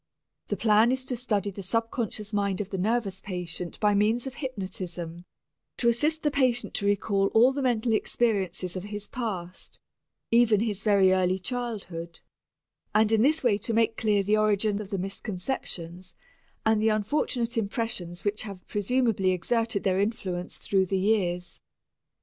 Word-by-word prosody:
The 205 - -2
plan 220 +3 +4
is 260 0 -1
to 255 - -1
study 210 -4 -1
the 195 - -8
subconscious 225 +1 -2
mind 200 -2 0
of 205 -2 -4
the 190 - -2
nervous 200 -2 0
patient 180 -2 -4
by 210 -1 +3
means 215 +5 +2
of 265 - -5
hypnotism, 185 - -5 0.5
to 235 - +3
assist 300 +7 +1
the 295 - +2
patient 255 -3 +1
to 200 - -1
recall 200 -1 +2
all 245 +4 +6
the 280 - -2
mental 240 -3 +1
experiences 195 -6 0
of 185 +1 -5
his 205 0 -4
past, 190 -7 -5 0.5
even 230 -3 +5
his 215 -3 -1
very 195 -3 +4
early 185 0 +2
childhood, 190 -7 -5 0.8
and 215 0 +4
in 220 -1 +4
this 305 +5 +3
way 215 -5 +3
to 225 +2 -2
make 225 0 +2
clear 210 -3 +1
the 210 +2 +2
origin 210 0 +1
of 200 - -8
the 200 - -2
misconceptions 185 -2 -5 0.5
and 220 -1 +3
the 220 - +3
unfortunate 235 +2 0
impressions 200 -5 -3
which 205 +1 0
have 195 -4 -8
presumably 210 -2 +1
exerted 225 +4 0
their 190 0 +2
influence 190 -4 -3
through 190 -1 +1
the 195 - 0
years. 185 -3 0
210 Hz, 160 wpm, -27 LUFS, 190-230 Hz, 0.8 s, all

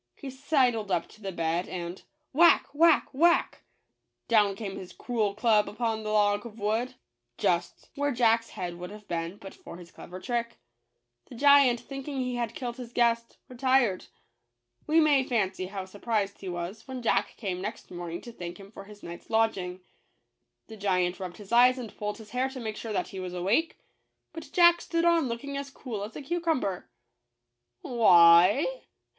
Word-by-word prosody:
He 275 - -8
sidled 255 -6 +1
up 175 -3 0
to 215 - -18
the 195 -1 -4
bed 170 +1 -2
and 175 0 -6
— 305 - -49
" - - -50
Whack! 340 +5 +5
— - - -29
Whack! 325 +1 +4
— - - -34
Whack! 340 +5 +2 0.2
" - - -51
— - - -55
down 210 -4 +3
came 195 -2 -6
his 180 -1 -9
cruel 220 -5 -2
club 215 -2 +3
upon 225 0 -2
the 215 - -5
log 205 -1 +2
of 230 -2 -10
wood, 225 +5 -1 0.4
just 175 0 -1
where 285 0 -1
Jack's 230 -2 +2
head 175 -1 -6
would 180 0 -7
have 210 +1 -10
JACK 205 - -31
THE - - -3
GIANT 165 -1 -1
KILLER. - - -6
been 190 - -14
but 195 -2 -11
for - - -11
his 170 -1 -13
clever 180 +1 -10
trick. 235 +1 -3 0.7
The - - -11
giant, 280 -2 +5
thinking 275 +1 -7
he 250 -1 -2
had 235 -2 -3
killed 245 -1 -5
his 245 -2 -8
guest, 235 -1 +1
retired. 255 -5 +1 0.8
We 315 +2 +4
may 295 -4 +4
fancy 195 -7 -1
how 190 -1 -6
surprised 205 +1 -2
he 190 - -5
was 175 +6 -6
when 260 -2 -6
Jack 230 - +1
came 185 -5 -4
next 210 +4 -7
morning 175 -1 -6
to 240 - -10
thank 175 -4 -8
him 200 0 -13
for 195 - -11
his 210 0 -15
night's 170 0 -10
lodging. 195 -5 0 0.8
The 220 - -11
giant 180 -3 0
rubbed 185 -2 -6
his 205 0 -13
eyes 250 +2 +6
and 235 -5 -8
pulled 210 0 -4
his 220 -2 -13
hair 255 +2 0
to 265 -1 -8
make 220 -3 -4
sure 225 0 -6
that 210 - -2
he 190 - -7
was 180 -1 -5
awake; 200 - 0 0.6
but 325 -4 -9
Jack 345 -1 +5
stood 335 0 -1 0.2
looking 240 +3 -5
on 280 - -4
as 280 0 -5
cool 235 -7 -6
as 215 +2 -8
a - - -7
cucumber. 320 - -2 0.9
"Why? 180 - +6
220 Hz, 200 wpm, -28 LUFS, 190-255 Hz, 0.9 s, eyes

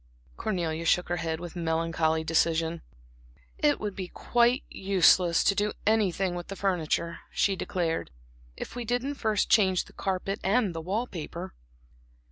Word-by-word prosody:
Cornelia 170 - -2
shook 180 +1 +2
her 175 - 0
head 165 -1 -2
with 175 0 -8
melancholy 160 -1 0
decision. 165 0 +1 0.8
"It 295 -1 +3
would 205 -2 -4
be 185 -2 -4
quite 240 +6 +2
useless 185 -2 +4
to - - +4
do 205 +1 0
anything 195 -4 +2
with 175 -1 -5
the 195 - -6
furniture," 170 -3 -1
she 195 - +1
declared, 170 -2 -2 0.5
"if - - -7
we 245 - -3
didn't 245 +5 -1
first 220 -7 0
change 190 -4 +3
the - - -17
carpet 195 +1 -2
and 205 -1 +2
the 165 - -4
wall 200 +8 -1
paper." 175 -2 -7
185 Hz, 150 wpm, -28 LUFS, 165-205 Hz, 0.8 s, useless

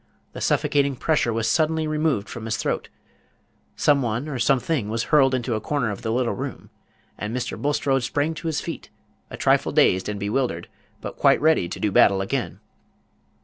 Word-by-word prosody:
The - - -8
suffocating 140 -1 +1
pressure 150 -3 +1
was 115 0 -1
suddenly 160 +5 +1
removed 155 -8 0
from 115 -2 -7
his 110 - -1
throat; - - -2 0.9
some 145 -2 +3
one 120 +3 -2
or 140 -4 -4
something 125 -1 +1
was 115 +1 -1
hurled 135 -3 +5
into 120 -1 -2
a 110 - -2
corner 140 -7 -1
of 100 - -7
the 110 - -2
little 120 -1 0
room; - - -7 0.5
and 110 +4 -3
Mr. 125 -1 -3
Bulstrode 140 -2 0
sprang 145 +6 -1
to 165 +1 -6
his 160 -2 -1
feet, - - -7 0.4
a - - -8
trifle - - +2
dazed 95 +2 +3
and 105 -1 -4
bewildered, 105 -3 -2 0.3
but - - -7
quite - - +4
ready 155 - +2
to - - -6
do 105 - 0
battle 95 0 +5
again. 95 - -3
125 Hz, 185 wpm, -23 LUFS, 110-145 Hz, 0.9 s, hurled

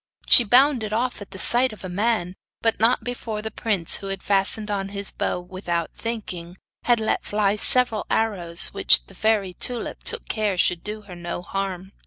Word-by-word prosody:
She 245 - +10
bounded 245 -1 +3
off 240 0 -2
at 200 - -9
the - - -10
sight 245 +6 +4
of 215 - -12
a - - -5
man, 185 -1 -1 0.3
but 225 -1 +1
not 230 +3 +2
before 225 -3 -5
the 220 - -5
prince, 200 -7 0
who 195 - -8
had 195 -1 -5
fastened 205 +2 +1
on 195 -1 -3
his 200 0 -2
bow - - -2
without 180 -2 -4
thinking, 185 -7 -6 0.3
had 240 -2 +3
let 220 - -1
fly 205 -1 0
several 230 0 +1
arrows, 180 -7 +1
which - - +3
the - - -17
fairy 210 -4 0
Tulip 240 +6 -1
took 465 0 +1
care 210 -4 -1
should 175 -1 +1
do 210 +1 -7
her 200 -3 -13
no 175 0 -6
harm. 190 -1 -5
205 Hz, 190 wpm, -23 LUFS, 185-225 Hz, 0.3 s, She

